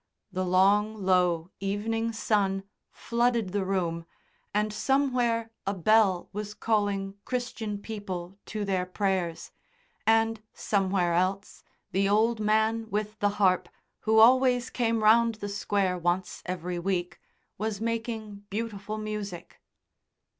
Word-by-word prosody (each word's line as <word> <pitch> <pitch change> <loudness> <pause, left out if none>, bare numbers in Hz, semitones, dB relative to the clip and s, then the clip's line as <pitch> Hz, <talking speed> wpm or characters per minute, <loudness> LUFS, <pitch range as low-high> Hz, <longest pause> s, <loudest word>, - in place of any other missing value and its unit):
The 185 0 -1
long 200 +4 +3
low 180 -2 +2
evening 225 +4 -1
sun 200 -3 0 0.3
flooded 235 -4 0
the 200 0 0
room, 170 -3 -2 0.4
and 210 +1 0
somewhere 240 -2 +1 0.2
a 200 - 0
bell 195 0 +3
was 210 0 -5
calling 205 -3 -1
Christian 235 -4 -3
people 195 -3 -6
to 210 -1 -3
their 185 -2 0
prayers, 185 -3 -2 0.6
and 225 0 +3
somewhere 190 -4 +1
else 185 +3 -1 0.3
the 195 +1 +2
old 220 +2 +3
man 220 +1 +1
with 210 +1 -3
the 205 - +3
harp, 185 -3 +3 0.3
who 220 0 +2
always 250 +2 +5
came 230 -2 0
round 230 +1 +5
the 205 -1 -6
Square 200 -2 0
once 175 +2 -1
every 180 0 -3
week, 180 -1 -2 0.4
was 215 -1 -2
making 225 -3 -4
beautiful 215 -1 -4
music. 210 -5 -6
205 Hz, 120 wpm, -28 LUFS, 190-225 Hz, 0.6 s, always